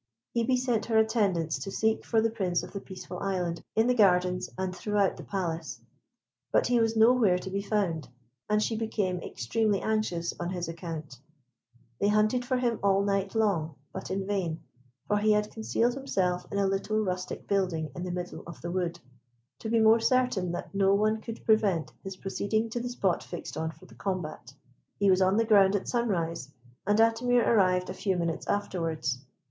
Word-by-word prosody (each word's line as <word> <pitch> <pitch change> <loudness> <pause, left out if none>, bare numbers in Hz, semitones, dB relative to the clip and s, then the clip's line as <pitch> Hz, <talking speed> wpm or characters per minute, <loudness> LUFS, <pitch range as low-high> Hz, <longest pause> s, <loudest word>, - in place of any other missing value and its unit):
Hebe 235 +2 +2
sent 245 -4 0
her 225 -1 +2
attendants 200 -8 +2
to 195 - -5
seek 220 +2 0
for 225 -1 +2
the 225 0 +1
Prince 185 -6 -1
of - - -8
the 200 - -3
Peaceful 185 -2 -8
Island 180 -3 -2
in 220 - +4
the 250 - +3
gardens, 180 -5 +3
and 185 -1 -2
throughout 205 0 +1
the - - -9
Palace; 170 -5 -3 0.7
but - - +3
he 245 -1 +3
was 225 0 +2
nowhere 220 -4 +5
to 185 +1 -6
be 200 +1 -1
found, 195 - -1 0.4
and 210 0 +3
she 225 - -1
became 210 -5 -1
extremely 205 - 0
anxious 215 -6 -1
on 175 - -2
his 180 -2 -3
account. 165 -5 -6 0.8
They 200 - +2
hunted 215 +4 +3
for 255 +1 0
him 240 -3 0
all 200 0 +3
night 195 0 -1
long, 175 -9 +1 0.2
but - - -6
in 190 0 -2
vain, 185 -5 -2 0.4
for 210 - +2
he 215 +1 +4
had 210 0 0
concealed 230 +2 0
himself 185 -10 -1
in 200 - -2
a 200 - +2
little 195 +2 0
rustic 185 -3 -3
building 180 -6 0
in - - -5
the 180 - -3
middle 180 0 -5
of 170 - -9
the 170 - -4
wood, 175 -2 -2 0.6
to 220 - -5
be 230 0 +3
more 220 +1 +6
certain 225 -6 +1
that 175 - -6
no 195 0 +4
one 215 +2 +1
could 230 0 -8
prevent 205 -7 +2
his 195 0 -6
proceeding 215 +4 -1
to 240 - -2
the 245 +1 -3
spot 195 -7 0
fixed 175 - -7
on 160 0 -2
for 175 +3 -13
the - - -16
combat. 155 - -5 0.4
He 200 -1 +4
was 185 0 +3
on 190 +2 +3
the 230 - +3
ground 200 -3 +5
at 200 - -2
sunrise, 170 - -1 0.4
and 205 0 +3
Atimir 235 +2 +3
arrived 185 -4 +3
a - - -5
few 190 -1 -1
minutes 170 -1 -2
afterwards. 165 -9 -1
195 Hz, 190 wpm, -29 LUFS, 180-220 Hz, 0.8 s, more